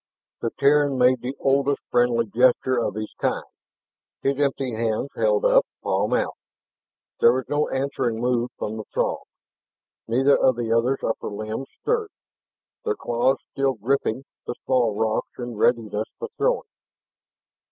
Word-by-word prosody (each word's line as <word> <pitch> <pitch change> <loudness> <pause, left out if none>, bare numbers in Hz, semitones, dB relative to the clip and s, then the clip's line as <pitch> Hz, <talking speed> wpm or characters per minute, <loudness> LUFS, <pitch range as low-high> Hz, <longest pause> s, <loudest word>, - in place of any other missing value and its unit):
The 115 - 0
Terran 140 0 +4
made 125 -1 +4
the 130 +2 -4
oldest 140 +1 +1
friendly 120 -1 +3
gesture 125 +3 +3
of 115 - -1
his 110 0 -5
kind; - - 0 0.8
his 135 0 +1
empty 135 -3 0
hands 115 +3 -1
held 105 -2 +2
up, - - +6 0.2
palm 105 +6 +1
out. - - 0 0.9
There 115 - +7
was 130 0 -2
no 145 +1 0
answering 130 -4 -1
move 120 0 +1
from 110 +1 -4
the 110 - -5
Throg. - - +1 0.9
Neither 130 +5 +4
of 130 - +3
the 115 -1 -2
other's 125 +4 +1
upper 115 - -2
limbs 110 +5 -5 0.2
stirred, 455 -3 0 0.7
their 445 -2 0
claws 125 - +1
still 135 -1 +1
gripping 130 +2 -1 0.2
the - - -3
small 120 -5 +2
rocks 110 0 -1
in 120 -2 -5
readiness 110 -1 +1
for 465 - -5
throwing. - - +1
125 Hz, 145 wpm, -24 LUFS, 115-135 Hz, 0.9 s, There